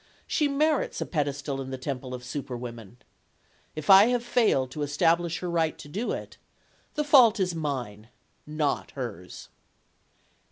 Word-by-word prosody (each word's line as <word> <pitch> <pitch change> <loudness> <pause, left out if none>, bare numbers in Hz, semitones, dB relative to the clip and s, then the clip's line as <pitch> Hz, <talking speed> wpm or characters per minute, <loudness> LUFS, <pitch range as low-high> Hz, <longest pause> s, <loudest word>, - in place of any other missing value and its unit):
She 300 - +1
merits 300 +1 0
a - - -2
pedestal 145 -3 -2
in 130 - -7
the 130 - -4
temple 130 -1 -5
of 125 - -9
superwomen. 120 -4 -7 0.8
If 155 -1 -6
I 195 +2 +9
have 245 -1 0
failed 215 - +2
to 150 - -6
establish 165 +3 +1
her 180 - -3
right 165 -2 0
to 195 +12 -4
it, - - -6 0.6
the 300 - 0
fault 255 -8 +6
is 180 -2 0
mine, 125 -9 -4 0.4
not 150 -2 -1
hers. 100 -9 -7
150 Hz, 145 wpm, -27 LUFS, 130-190 Hz, 0.8 s, I